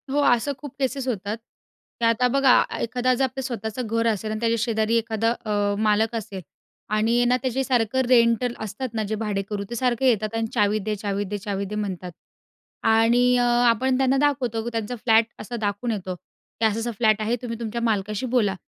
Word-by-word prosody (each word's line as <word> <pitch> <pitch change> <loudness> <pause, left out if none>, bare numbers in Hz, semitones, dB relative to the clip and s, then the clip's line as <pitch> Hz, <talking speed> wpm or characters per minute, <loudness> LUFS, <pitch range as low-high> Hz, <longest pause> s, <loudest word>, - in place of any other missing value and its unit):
हो, 285 +2 +1
असं 245 0 +3
खूप 290 -3 -9
केसेस 265 0 -1
होतात 210 -2 -2 0.6
तर - - +3
आता 230 +2 +3
बघा 265 0 +5 0.2
एखादा 250 +2 +1
जर 255 - 0
आपलं 265 0 -2
स्वतःचं 235 -1 -4
घर 230 +1 0
असेल 215 -1 -1
आणि 215 - -3
त्याच्या 230 0 +1
शेजारी 220 0 0
एखादा 225 0 0
अ, 205 -1 0
मालक 220 +1 +2
असेल 195 -4 -5 0.5
आणि 230 +3 +2
ना, 250 +1 +3
त्याचे 260 0 -1
सारखं 250 -1 +1
रेंटल 235 0 +4
असतात 220 +4 -5
ना 220 -1 -1
जे 215 - 0
भाडेकरू, 205 -1 -3
ते 235 - -4
सारखे 250 +1 +1
येतात 215 -1 0
आणि 225 0 -1
चावी 210 -2 +2
दे, 210 +1 -2
चावी 200 0 -2
दे, 205 +2 -4
चावी 200 -1 -3
दे 210 +2 -6
म्हणतात 190 -4 -4 0.7
आणि 235 +3 +4
अ, 245 - +3 0.3
आपण 255 +3 +2
त्यांना 265 0 +2
दाखवतो 255 -6 0
की 235 - -3
त्यांचा 225 +1 -3
फ्लॅट 225 -1 +3
असा 240 +3 -6
दाखवून 215 +1 -2
येतो 190 -4 -4
की 220 +5 -7
असा 220 0 +1
असा 240 +1 -2
फ्लॅट 215 -1 +3
आहे 220 +3 0
तुम्ही 230 -2 -5
तुमच्या 235 0 -4
मालकाशी 215 0 -1
बोला 235 -6 +1
225 Hz, 195 wpm, -24 LUFS, 210-245 Hz, 0.7 s, बघा